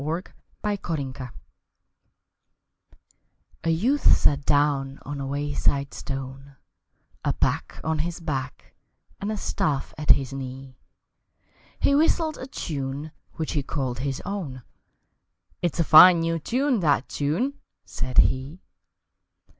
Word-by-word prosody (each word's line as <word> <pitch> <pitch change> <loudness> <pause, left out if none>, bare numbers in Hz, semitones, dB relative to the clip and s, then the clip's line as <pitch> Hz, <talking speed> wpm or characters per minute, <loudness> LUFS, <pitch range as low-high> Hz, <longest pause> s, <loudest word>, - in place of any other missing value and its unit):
Possession 145 -11 -3 2.3
A 165 - 0
YOUTH 235 - +2
sat 140 -1 +2
down 140 -2 +2
on 145 0 -5
a 135 - -3
wayside 140 0 0
stone, 135 0 -7 0.7
A - - +1
pack - - -1
on 160 0 -1
his 170 +2 -2
back 135 -6 -5 0.5
and 205 +2 -3
a 215 - -2
staff 145 -7 -1
at 150 - -5
his 135 -1 +4
knee. 130 0 -7 1.0
He - - +3
whistled 315 +1 +2
a 260 - -6
tune 145 - -4 0.2
which 160 - -3
he 150 - 0
called 130 -3 -3
his 135 0 -3
own, 160 -11 -5 1.0
"It's 175 -1 -1
a - - +4
fine 165 +3 +9
new 165 0 0
tune, 255 - +1
that 145 -6 +2
tune!" 180 - -1 0.3
said 130 0 -5
he. 135 +7 +2
145 Hz, 115 wpm, -25 LUFS, 135-175 Hz, 2.3 s, fine